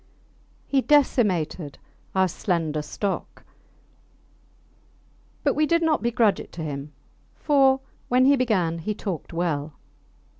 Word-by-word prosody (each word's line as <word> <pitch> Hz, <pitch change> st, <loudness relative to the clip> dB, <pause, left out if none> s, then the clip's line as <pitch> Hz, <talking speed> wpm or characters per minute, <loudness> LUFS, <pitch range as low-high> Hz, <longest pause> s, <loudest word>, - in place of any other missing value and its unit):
He 275 Hz, -1 st, +1 dB
decimated 195 Hz, -, +1 dB, 0.4 s
our 190 Hz, 0 st, +4 dB
slender 165 Hz, -4 st, -1 dB
stock; 195 Hz, +6 st, -4 dB, 2.0 s
but 285 Hz, -, +2 dB
we 305 Hz, +1 st, +1 dB
did 335 Hz, +1 st, +2 dB
not 315 Hz, -2 st, +2 dB
begrudge 230 Hz, -4 st, +2 dB
it -, -, -9 dB
to 165 Hz, -, -6 dB
him, 145 Hz, -1 st, -5 dB, 0.4 s
for, 270 Hz, -3 st, +3 dB, 0.3 s
when 255 Hz, +1 st, +4 dB
he 280 Hz, +1 st, +6 dB
began, 190 Hz, -10 st, 0 dB
he 210 Hz, +6 st, -3 dB
talked 190 Hz, -7 st, -5 dB
well. 160 Hz, -3 st, -2 dB
200 Hz, 115 wpm, -24 LUFS, 165-265 Hz, 2.0 s, he